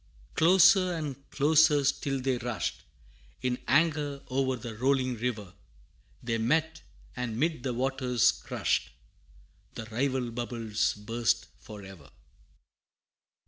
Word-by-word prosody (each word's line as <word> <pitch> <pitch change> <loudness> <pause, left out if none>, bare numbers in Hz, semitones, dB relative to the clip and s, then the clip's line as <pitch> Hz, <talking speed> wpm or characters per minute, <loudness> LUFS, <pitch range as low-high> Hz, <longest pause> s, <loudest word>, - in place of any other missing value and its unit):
Closer 185 +2 +5
and 145 -4 -6
closer 150 0 +4
still 135 0 0
they 130 -1 -1
rushed, 110 - -4 0.6
In 125 0 -1
anger 145 -2 +1
o'er 130 0 +1
the 115 -2 -8
rolling 130 +1 +1
river; 110 -5 -4 0.7
They 115 -1 -1
met, 160 +8 0 0.3
and 120 -3 -4
'mid 155 0 0
the 125 -2 -3
waters 130 -1 +2
crushed, - - -2 0.9
The 110 - -6
rival 130 0 -1
bubbles 115 -2 -2
burst 115 +2 -1
for 105 -2 -11
ever! 95 -2 -13
130 Hz, 110 wpm, -29 LUFS, 115-145 Hz, 0.9 s, Closer